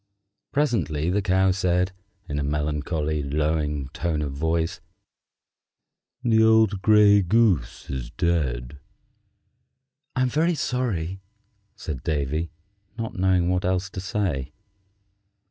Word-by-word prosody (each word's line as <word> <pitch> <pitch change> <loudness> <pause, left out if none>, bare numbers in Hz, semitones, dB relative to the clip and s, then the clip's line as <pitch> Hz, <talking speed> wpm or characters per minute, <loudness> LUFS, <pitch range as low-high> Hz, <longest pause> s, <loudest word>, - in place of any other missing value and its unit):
Presently 90 - 0
the 105 +2 +1
Cow 95 0 +3
said, 90 0 +1 0.4
in 75 0 -2
a - - -1
melancholy, 75 +1 -1
lowing 75 0 -1
tone 80 +1 -2
of 70 - -3
voice, 80 +3 -1 1.4
"The 110 -2 +4
old 110 -3 +4
gray 105 -1 +6
goose 95 - +1
is 65 -3 -5
dead." 70 -6 -1 1.4
"I'm 130 -1 +2
very 160 +6 +1
sorry," 95 - -2 0.5
said 75 -6 -6
Davy, 75 +2 -1 0.5
not 115 -1 -4
knowing 90 -2 +2
what 90 0 0
else 95 +1 -1
to 95 - -5
say. 85 -8 -2
85 Hz, 110 wpm, -24 LUFS, 75-100 Hz, 1.4 s, gray